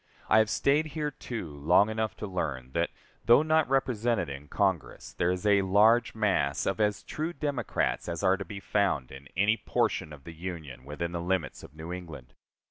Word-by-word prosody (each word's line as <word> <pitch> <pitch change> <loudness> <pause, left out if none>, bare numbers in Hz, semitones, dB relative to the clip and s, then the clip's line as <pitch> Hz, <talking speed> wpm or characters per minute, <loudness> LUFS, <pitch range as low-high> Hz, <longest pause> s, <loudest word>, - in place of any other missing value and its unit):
I - - +6
have 110 -1 +3
staid 145 +7 +2
here, 150 -1 -1
too, 110 - -6
long 85 +8 +4
enough 110 0 -2
to - - -5
learn 70 -10 -3
that, 85 +4 0 0.4
though 120 +6 +6
not 155 -2 +2
represented 120 - +1
in 70 +1 -8
Congress, 95 +1 -1
there 85 - 0
is 90 +2 -2
a 100 -1 +5
large 110 +5 +4
mass 95 -10 +1
of 95 - -1
as 105 -1 +1
true 160 +3 -4
Democrats 140 - -1
as 85 +1 -4
are 95 0 +4
to 100 - -4
be 100 +2 -8
found 95 -11 0
in 65 +1 -11
any 105 +3 +3
portion 75 - -1
of 70 -2 -11
the 85 - -9
Union 80 -7 -7
within 80 +4 -4
the 85 -1 -3
limits 90 -4 -2
of 70 - -13
New 80 +3 -6
England. 85 -8 -9
95 Hz, 195 wpm, -29 LUFS, 80-110 Hz, 0.4 s, I